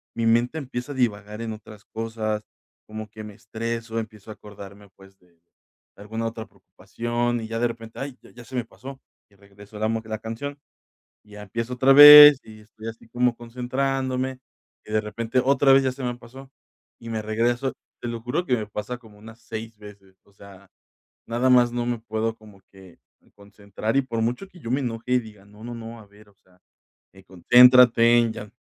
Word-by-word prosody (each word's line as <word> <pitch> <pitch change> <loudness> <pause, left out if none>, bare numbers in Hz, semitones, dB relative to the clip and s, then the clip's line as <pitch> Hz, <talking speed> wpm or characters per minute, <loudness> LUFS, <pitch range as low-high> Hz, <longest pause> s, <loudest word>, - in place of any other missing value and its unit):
mi 115 - -2
mente 120 +6 +2
empieza 130 0 -6
a - - -11
divagar 105 -3 -2
en 115 -1 -4
otras 105 -1 -13
cosas, 110 -1 -4 0.4
como 110 0 -8
que 110 +1 -11
me 105 - -10
estreso, 115 +2 -5
empiezo 110 -1 -10
a - - -6
acordarme, 100 0 -13
pues, 95 0 -19
de 85 -2 -30 0.6
alguna 110 +3 -6
otra 115 0 -6
preocupación 120 0 -4
y 110 - -6
ya 115 +1 -4
de 120 - +2
repente, 115 -1 -10
¡ay!, 135 -2 -6
ya 120 -1 -15
se 130 +3 -10
me 125 - -1
pasó 135 +3 -12 0.3
y 100 - -27
regreso 100 +1 -16
la 110 +1 -1 0.2
la 110 0 -5
canción 115 +6 -6 0.7
y 105 - -21
ya 105 0 -10
empiezo 115 +4 -5
otra 130 +2 +3
vez 145 0 +11
y 110 -1 -14
estoy 110 +1 -12
así 115 0 -10
como 120 0 0
concentrándome 130 +2 -3 0.5
y - - -11
de 110 - +3
repente 115 +4 -2
otra 135 +1 +3
vez 135 - +6
ya 130 - 0
se 135 0 -9
me 125 -1 -2
pasó 130 +3 -14 0.5
y 115 - -12
me 110 -1 -3
regreso. 120 +5 -1 0.3
Te 120 - -4
lo 115 0 -5
juro 125 +9 -2
que 125 -6 +1
me 105 -1 -5
pasa 105 +4 -6
como 110 -4 -19
unas 110 +2 -14
6 110 0 -8
veces, 100 -2 -16
o 100 - -27
sea, 100 0 -16 0.6
nada 120 +3 +1
más 125 -1 +5
no 120 0 -2
me 120 -1 -2
puedo 110 0 -3
como 105 -3 -18
que 95 -2 -17 0.4
concentrar 100 +2 -6
y - - +3
por 115 -3 -4
mucho 125 +12 -3
que 185 - -18
yo 115 - -7
me 130 +3 +1
enoje 120 -1 -4
y 125 - +4
diga: 105 -4 -11
"No 105 +2 -16
no 120 0 -7
no, 115 0 -9
a 105 - -16
ver, 105 +1 -21
o - - -29
sea, 90 -1 -28 0.6
eh, 95 0 -17
concéntrate 120 +4 +5
ya 105 -1 -9
115 Hz, 200 wpm, -23 LUFS, 105-125 Hz, 0.7 s, vez